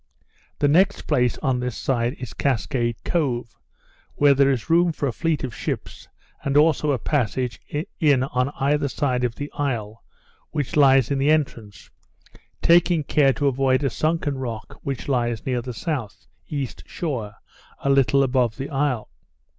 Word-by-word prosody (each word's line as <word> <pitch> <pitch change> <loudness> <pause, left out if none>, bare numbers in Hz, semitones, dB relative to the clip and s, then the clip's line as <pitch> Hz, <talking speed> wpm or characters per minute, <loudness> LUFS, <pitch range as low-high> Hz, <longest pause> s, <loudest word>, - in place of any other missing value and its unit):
The 145 - +2
next 175 +7 +3
place, 125 -1 +1
on 130 -2 +1
this 125 -2 -3
side, 120 -2 0
is 125 -3 -7
Cascade 120 -2 0
Cove, 125 -9 -1 0.6
where 145 -1 +5
there 140 0 +4
is 130 -4 -1
room 170 +1 +4
for 150 - -3
a - - 0
fleet 155 +6 -1
of 130 -4 -4
ships, - - -5 0.4
and 140 +1 +1
also 150 -1 +3
a 135 - +1
passage 125 -1 -1 0.4
in 145 -7 +4
on 125 0 0
either 145 +1 +1
side 130 -2 -1
of 120 -1 -1
the 145 0 -6
isle, 115 -7 -3 0.5
which 145 -4 -3
lies 135 -3 +5
in 140 - +1
the 140 +2 +2
entrance, 120 -9 -1 0.7
taking 170 -1 +4
care 140 -1 +3
to 145 - -2
avoid 135 0 +2
a 135 - +1
sunken 155 -1 -1
rock 115 -4 -6
which 135 -2 -4
lies 120 -4 -1
near 125 -2 -1
the 125 +1 -6
south 125 - -4 0.2
east 140 -4 -4
shore, 120 -11 -4 0.5
a 140 - +1
little 135 0 +4
above 125 -4 +1
the 135 +3 -5
isle. 135 - -1
135 Hz, 160 wpm, -23 LUFS, 125-145 Hz, 0.7 s, where